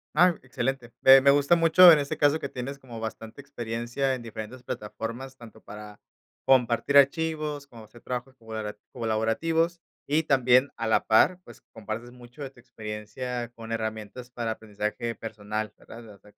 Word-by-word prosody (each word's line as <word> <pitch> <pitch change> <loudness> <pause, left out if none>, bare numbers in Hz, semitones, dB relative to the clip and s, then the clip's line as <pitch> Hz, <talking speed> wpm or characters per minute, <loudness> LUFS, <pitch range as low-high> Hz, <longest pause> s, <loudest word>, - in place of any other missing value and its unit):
Ah, 175 +1 +5
excelente. 125 -1 -3
Me 135 0 +8
me 140 +1 +6
gusta 145 +4 +4
mucho, 170 +2 +7
en 155 -3 +8
este 140 - -3
caso, 145 +1 +3
que 140 - -5
tienes 130 +3 -6
como 120 -4 -10
bastante 110 +2 -7
experiencia 120 0 -3
en 130 - -4
diferentes 115 +2 -8
plataformas, 120 +5 -6
tanto 115 -2 -14
para 105 0 -11 0.4
compartir 130 +2 +3
archivos, 150 0 +2
como 115 -5 -14
hacer 115 +2 -18
trabajos 125 +1 -5
colabora 110 -3 -7
colaborativos, 125 +10 0 0.3
y 155 +3 +1
también 130 -1 +4
a 115 - -3
la 110 - +2
par, 145 +11 +4
pues, - - -14
compartes 110 +2 -6
mucho 125 +3 -12
de 135 - -5
tu 130 - -21
experiencia 120 +1 -6
con 115 0 -9
herramientas 110 +2 -5
para 115 -2 -3
aprendizaje 110 +1 -4
personal, 110 -1 -5
¿verdad?, 115 - -13
o 100 -2 -15
sea, 105 +1 -20
120 Hz, 165 wpm, -26 LUFS, 110-140 Hz, 0.4 s, Me